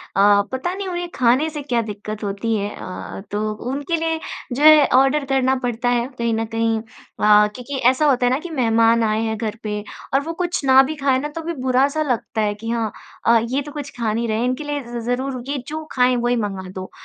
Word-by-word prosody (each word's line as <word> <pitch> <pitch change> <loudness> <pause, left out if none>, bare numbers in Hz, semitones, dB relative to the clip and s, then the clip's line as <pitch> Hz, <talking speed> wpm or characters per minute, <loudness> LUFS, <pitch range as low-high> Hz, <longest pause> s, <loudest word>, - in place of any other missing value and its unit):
अ, 200 +1 +5
पता 265 +8 -2
नहीं 390 0 -5
उन्हें 350 -1 -3
खाने 255 +6 +3
से 300 -1 -6
क्या 245 -4 0
दिक्कत 210 +1 -6
होती 205 +3 -1
है? 205 -1 -1
अ - - -11
अ, 185 - -7
तो 215 +1 -1 0.2
उनके 285 +5 -2
लिए 325 0 -1 0.3
जो 265 +4 -1
है 305 -2 +8
ऑर्डर 275 +2 +2
करना 265 -1 +2
पड़ता 245 0 -1
है 240 0 +1
कहीं 235 -1 0
न 225 0 -1
कहीं 225 0 0
अ, 210 -1 +2
क्योंकि 270 +3 -5
ऐसा 265 +4 +1
होता 250 -2 +2
है - - +4
ना 260 - +1
कि 350 - -8
मेहमान 230 -5 +3
आए 215 0 +1
हैं 220 -1 -2
घर 215 0 -3
पे 210 -1 -3 0.3
और 270 - +4
वो 330 - -2
कुछ 350 -3 -2
ना 265 0 +7
भी 305 +4 -3
खाएँ 275 -3 +1
ना 295 - -3
तो 330 - -3
भी 335 +1 -4
बुरा 255 +2 +4
सा - - +2
लगता 225 -1 -2
है 210 -1 +1
कि 225 +2 -7
हाँ, 230 -2 -1 0.3
अ, 230 0 +6
ये 265 +3 0
तो 295 +1 -8
कुछ 290 -1 -6
खा 225 -3 0
नहीं 230 +2 -1
रहे 215 -1 0
हैं 235 - 0
इनके 255 +4 -1
लिए 290 -1 -3
ज़ 240 0 -7
ज़रूर 255 0 -2
ये 285 +1 -2
जो 310 +1 -5
खाएँ 250 -1 +3
वही 245 - +2
मँगा 195 -5 -3
दो। 185 0 -7
245 Hz, 245 wpm, -21 LUFS, 220-280 Hz, 0.3 s, है